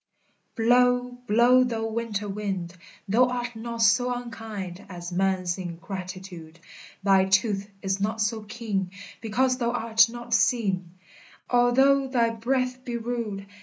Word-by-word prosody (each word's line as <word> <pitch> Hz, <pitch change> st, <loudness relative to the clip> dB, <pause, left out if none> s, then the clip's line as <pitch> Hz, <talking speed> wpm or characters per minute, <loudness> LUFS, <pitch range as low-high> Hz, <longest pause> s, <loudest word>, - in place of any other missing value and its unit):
Blow, 245 Hz, +2 st, +3 dB, 0.2 s
blow, 240 Hz, +4 st, +5 dB
thou 230 Hz, -3 st, -2 dB
winter 220 Hz, -2 st, -3 dB
wind, 195 Hz, -4 st, -4 dB, 0.3 s
Thou 230 Hz, +6 st, +4 dB
art 245 Hz, -1 st, -3 dB
not 230 Hz, 0 st, -3 dB
so 245 Hz, +3 st, +4 dB
unkind 220 Hz, -6 st, -6 dB
As 175 Hz, -1 st, -7 dB
man's 185 Hz, 0 st, 0 dB
ingratitude; 180 Hz, -1 st, -7 dB, 0.4 s
Thy 195 Hz, -1 st, +5 dB
tooth 195 Hz, +1 st, +1 dB
is 195 Hz, 0 st, -1 dB
not 215 Hz, +2 st, -1 dB
so 220 Hz, +1 st, 0 dB
keen, 210 Hz, -4 st, -3 dB, 0.3 s
Because 255 Hz, +3 st, +1 dB
thou 235 Hz, -1 st, +1 dB
art 230 Hz, -1 st, +3 dB
not 240 Hz, 0 st, -6 dB
seen, 190 Hz, -7 st, +1 dB, 0.6 s
Although 265 Hz, +3 st, +4 dB
thy 235 Hz, -3 st, +2 dB
breath 255 Hz, +2 st, -1 dB
be 240 Hz, -2 st, -3 dB
rude. 225 Hz, -4 st, -4 dB
225 Hz, 130 wpm, -26 LUFS, 195-245 Hz, 0.6 s, blow